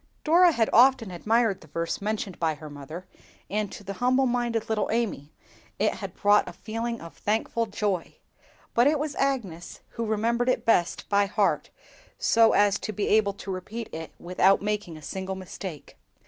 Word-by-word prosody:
Dora 345 Hz, +3 st, +6 dB
had 230 Hz, -7 st, +1 dB
often 250 Hz, -4 st, +5 dB
admired 215 Hz, +3 st, +1 dB
the 155 Hz, -, -15 dB
verse 165 Hz, +5 st, -3 dB
mentioned 210 Hz, -2 st, -3 dB
by 160 Hz, -2 st, +1 dB
her 150 Hz, 0 st, -10 dB
mother, 145 Hz, +5 st, -8 dB, 0.5 s
and 210 Hz, 0 st, -1 dB
to -, -, -9 dB
the 200 Hz, 0 st, -5 dB
humble 255 Hz, +2 st, +3 dB
minded 240 Hz, -2 st, 0 dB
little 220 Hz, -1 st, 0 dB
Amy 215 Hz, -11 st, -2 dB, 0.5 s
it -, -, +2 dB
had -, -, -7 dB
brought 205 Hz, +1 st, +4 dB
a -, -, -10 dB
feeling 230 Hz, +1 st, -4 dB
of 165 Hz, -, -11 dB
thankful 225 Hz, +2 st, -1 dB
joy; 200 Hz, -4 st, -2 dB, 0.6 s
but 240 Hz, +3 st, +4 dB
it 305 Hz, +1 st, +3 dB
was 295 Hz, 0 st, -3 dB
Agnes 225 Hz, -12 st, -2 dB
who 230 Hz, -, -4 dB
remembered 235 Hz, +3 st, +1 dB
it 245 Hz, -2 st, 0 dB
best 180 Hz, -6 st, +2 dB
by 200 Hz, 0 st, +3 dB
heart, 205 Hz, 0 st, +1 dB, 0.5 s
so 225 Hz, -1 st, +4 dB
as 205 Hz, 0 st, +3 dB
to 215 Hz, -, -4 dB
be 205 Hz, 0 st, -2 dB
able 210 Hz, -2 st, +3 dB
now -, -, -26 dB
to 195 Hz, -, -5 dB
repeat 215 Hz, +5 st, -6 dB
it 160 Hz, 0 st, -6 dB
without 185 Hz, +2 st, +3 dB
making 205 Hz, -5 st, -3 dB
a 155 Hz, -, -13 dB
single 190 Hz, +2 st, -4 dB
mistake. 185 Hz, -3 st, -8 dB
210 Hz, 180 wpm, -26 LUFS, 185-230 Hz, 0.6 s, Dora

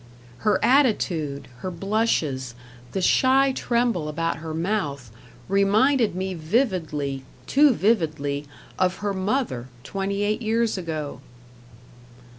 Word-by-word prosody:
Her 210 Hz, -3 st, +2 dB
attitude, 180 Hz, -, +2 dB
her 185 Hz, -, -4 dB
blushes, 170 Hz, -, -1 dB, 0.4 s
the 190 Hz, -, -2 dB
shy 270 Hz, +5 st, +4 dB
tremble 235 Hz, -11 st, 0 dB
about 165 Hz, +2 st, -1 dB
her 160 Hz, 0 st, -6 dB
mouth, 160 Hz, -, -2 dB, 0.4 s
reminded 210 Hz, +5 st, +3 dB
me 190 Hz, +1 st, -2 dB
vividly, 160 Hz, -, -1 dB, 0.2 s
too 290 Hz, +1 st, +5 dB
vividly, 155 Hz, -9 st, 0 dB, 0.3 s
of 185 Hz, 0 st, +2 dB
her 200 Hz, -, 0 dB
mother 190 Hz, -, -1 dB, 0.2 s
twenty 195 Hz, +5 st, -2 dB
eight 210 Hz, +3 st, 0 dB
years 225 Hz, 0 st, +1 dB
ago. 160 Hz, -5 st, -4 dB
190 Hz, 105 wpm, -24 LUFS, 155-225 Hz, 0.4 s, too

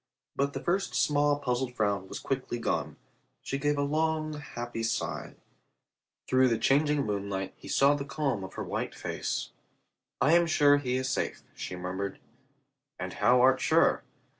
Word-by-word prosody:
But 140 Hz, +1 st, 0 dB
the -, -, -5 dB
first 190 Hz, +3 st, 0 dB
small 145 Hz, 0 st, +3 dB
puzzled 125 Hz, -2 st, -2 dB
frown 100 Hz, -4 st, 0 dB
was -, -, -6 dB
quickly 130 Hz, -3 st, -3 dB
gone. 115 Hz, -, -2 dB, 0.5 s
She 135 Hz, -, -3 dB
gave 145 Hz, +1 st, +1 dB
a 145 Hz, -, +1 dB
long 155 Hz, +1 st, 0 dB
happy 120 Hz, -6 st, -6 dB
sigh. 115 Hz, -, -2 dB, 0.9 s
Through 130 Hz, 0 st, +4 dB
the 115 Hz, -2 st, +2 dB
changing 145 Hz, +4 st, +2 dB
moonlight 100 Hz, -2 st, -3 dB
he -, -, -13 dB
saw 140 Hz, +1 st, +4 dB
the 145 Hz, -1 st, -2 dB
calm 140 Hz, -7 st, -2 dB
of 95 Hz, -, -9 dB
her -, -, -3 dB
white -, -, -3 dB
face. -, -, -3 dB, 0.7 s
"I 155 Hz, -, +4 dB
am 170 Hz, 0 st, +5 dB
sure 145 Hz, -3 st, +5 dB
he 130 Hz, -3 st, -1 dB
is 130 Hz, 0 st, -1 dB
safe," -, -, -2 dB
she 90 Hz, -, -6 dB
murmured. 90 Hz, +2 st, -4 dB, 0.8 s
"And -, -, -5 dB
how 125 Hz, 0 st, +4 dB
art 130 Hz, +1 st, +5 dB
sure?" -, -, +3 dB
135 Hz, 165 wpm, -29 LUFS, 115-145 Hz, 0.9 s, am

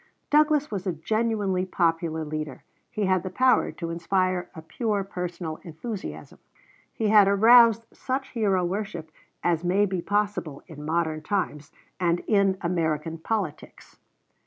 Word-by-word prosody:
Douglas 300 Hz, -2 st, +3 dB
was 195 Hz, -2 st, -4 dB
a 180 Hz, -, 0 dB
genuinely 205 Hz, +1 st, 0 dB
popular 165 Hz, -3 st, 0 dB
leader. 155 Hz, -2 st, -5 dB, 0.3 s
He 210 Hz, -, -2 dB
had 185 Hz, -1 st, +2 dB
the 185 Hz, -, -5 dB
power 255 Hz, +7 st, +3 dB
to 170 Hz, -1 st, -5 dB
inspire 185 Hz, +1 st, 0 dB
a 160 Hz, -, -9 dB
pure 205 Hz, +4 st, -1 dB
personal 175 Hz, -4 st, -5 dB
enthusiasm. 190 Hz, +5 st, -7 dB, 0.5 s
He 220 Hz, -2 st, -1 dB
had 210 Hz, -2 st, +7 dB
aroused 230 Hz, +2 st, +6 dB
such 270 Hz, +1 st, -3 dB
hero 195 Hz, -6 st, +1 dB
worship 175 Hz, -4 st, -4 dB, 0.3 s
as 170 Hz, -1 st, +1 dB
may 190 Hz, +4 st, +3 dB
be 185 Hz, -3 st, -2 dB
possible 205 Hz, -8 st, -2 dB
in 150 Hz, -4 st, -10 dB
modern 160 Hz, 0 st, -1 dB
times 155 Hz, -5 st, -3 dB, 0.3 s
and 175 Hz, -1 st, +1 dB
in 200 Hz, -3 st, +2 dB
American 165 Hz, -2 st, -1 dB
polities. 195 Hz, -3 st, -5 dB
185 Hz, 135 wpm, -26 LUFS, 165-210 Hz, 0.5 s, had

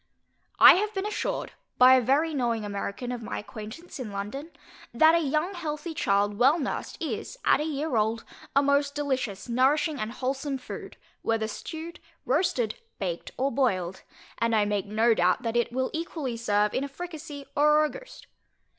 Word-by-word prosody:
I -, -, +10 dB
have 420 Hz, +2 st, -1 dB
been 385 Hz, +1 st, -1 dB
assured 425 Hz, 0 st, -2 dB, 0.3 s
by 255 Hz, +1 st, +8 dB
a 260 Hz, -, +6 dB
very 290 Hz, +7 st, +2 dB
knowing 235 Hz, -5 st, 0 dB
American 205 Hz, +4 st, -4 dB
of 245 Hz, -1 st, -4 dB
my 225 Hz, -, -5 dB
acquaintance 220 Hz, +11 st, -8 dB
in 235 Hz, -5 st, -5 dB
London, 210 Hz, +10 st, -5 dB, 0.5 s
that 315 Hz, +6 st, +6 dB
a 335 Hz, -, +4 dB
young 310 Hz, +5 st, 0 dB
healthy 320 Hz, -2 st, -4 dB
child 205 Hz, -5 st, +1 dB
well 270 Hz, +6 st, +5 dB
nursed, 285 Hz, -, -4 dB
is, -, -, -4 dB
at -, -, +5 dB
a -, -, -1 dB
year 300 Hz, -2 st, -2 dB
old, 220 Hz, +1 st, +1 dB, 0.3 s
a 280 Hz, -, +5 dB
most 280 Hz, 0 st, +2 dB
delicious 260 Hz, -9 st, -2 dB
nourishing 275 Hz, +5 st, +2 dB
and 215 Hz, +1 st, -3 dB
wholesome 270 Hz, +2 st, -2 dB
food, 250 Hz, -, -9 dB, 0.2 s
whether 225 Hz, -1 st, 0 dB
stewed, 320 Hz, +9 st, -7 dB, 0.3 s
roasted, 255 Hz, -, 0 dB, 0.2 s
baked, 175 Hz, -4 st, -4 dB
or 275 Hz, +2 st, +1 dB
boiled; 190 Hz, -8 st, 0 dB, 0.4 s
and 230 Hz, -1 st, +2 dB
I 210 Hz, -1 st, +3 dB
make 205 Hz, -1 st, -1 dB
no 225 Hz, +3 st, +3 dB
doubt 180 Hz, -3 st, +2 dB
that 230 Hz, 0 st, -2 dB
it 240 Hz, 0 st, +1 dB
will 260 Hz, +1 st, -1 dB
equally 315 Hz, -6 st, -3 dB
serve 210 Hz, -2 st, +1 dB
in 265 Hz, -, 0 dB
a 280 Hz, -, -4 dB
fricasee, 300 Hz, -2 st, -8 dB
or 300 Hz, +1 st, +5 dB
a -, -, +1 dB
ragoust. -, -, -11 dB
260 Hz, 175 wpm, -27 LUFS, 220-305 Hz, 0.5 s, I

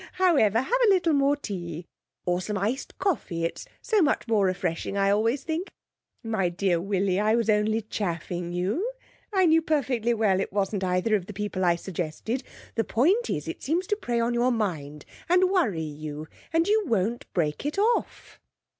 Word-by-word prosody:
However, 275 Hz, -, +3 dB
have -, -, 0 dB
a -, -, +6 dB
little 355 Hz, -5 st, +3 dB
more 280 Hz, 0 st, +3 dB
tea, 175 Hz, -, -6 dB, 0.4 s
or 180 Hz, 0 st, +1 dB
some 205 Hz, +2 st, -3 dB
iced 220 Hz, +8 st, -2 dB
coffee, 240 Hz, -, -1 dB
it's 165 Hz, -, -5 dB, 0.2 s
so 440 Hz, -4 st, +2 dB
much 290 Hz, -5 st, +1 dB
more 210 Hz, -4 st, +3 dB
refreshing 180 Hz, +1 st, -2 dB
I 195 Hz, 0 st, +3 dB
always 225 Hz, +6 st, +1 dB
think. 330 Hz, +4 st, -3 dB, 0.5 s
My 220 Hz, -6 st, 0 dB
dear 175 Hz, -1 st, 0 dB
Willie, 195 Hz, 0 st, 0 dB
I 215 Hz, +2 st, +3 dB
was 230 Hz, -2 st, +2 dB
only 215 Hz, +1 st, +1 dB
chaffing 175 Hz, -4 st, -3 dB
you. 210 Hz, -, -1 dB, 0.4 s
I 380 Hz, -3 st, +3 dB
knew 325 Hz, -1 st, +5 dB
perfectly 255 Hz, -7 st, 0 dB
well 205 Hz, -4 st, +2 dB
it 195 Hz, -, -2 dB
wasn't 195 Hz, 0 st, -1 dB
either 180 Hz, +4 st, +1 dB
of 190 Hz, -3 st, -2 dB
the 210 Hz, -, -7 dB
people 195 Hz, -1 st, -3 dB
I 175 Hz, -1 st, +4 dB
suggested. 180 Hz, +7 st, -4 dB, 0.3 s
The 225 Hz, -, +1 dB
point 370 Hz, -, +2 dB
is, -, -, -2 dB
it -, -, -5 dB
seems 335 Hz, +7 st, 0 dB
to 415 Hz, -, 0 dB
prey 245 Hz, -, -2 dB
on 235 Hz, +1 st, +1 dB
your 240 Hz, +2 st, +2 dB
mind, 155 Hz, -, -3 dB, 0.2 s
and 365 Hz, +1 st, +4 dB
worry 230 Hz, -, +1 dB
you, 155 Hz, 0 st, -6 dB, 0.2 s
and 330 Hz, +1 st, +2 dB
you 430 Hz, +1 st, +4 dB
won't 225 Hz, 0 st, -1 dB
break 150 Hz, -4 st, 0 dB
it 290 Hz, +5 st, -3 dB
off.' 450 Hz, +4 st, 0 dB
215 Hz, 180 wpm, -26 LUFS, 180-290 Hz, 0.5 s, a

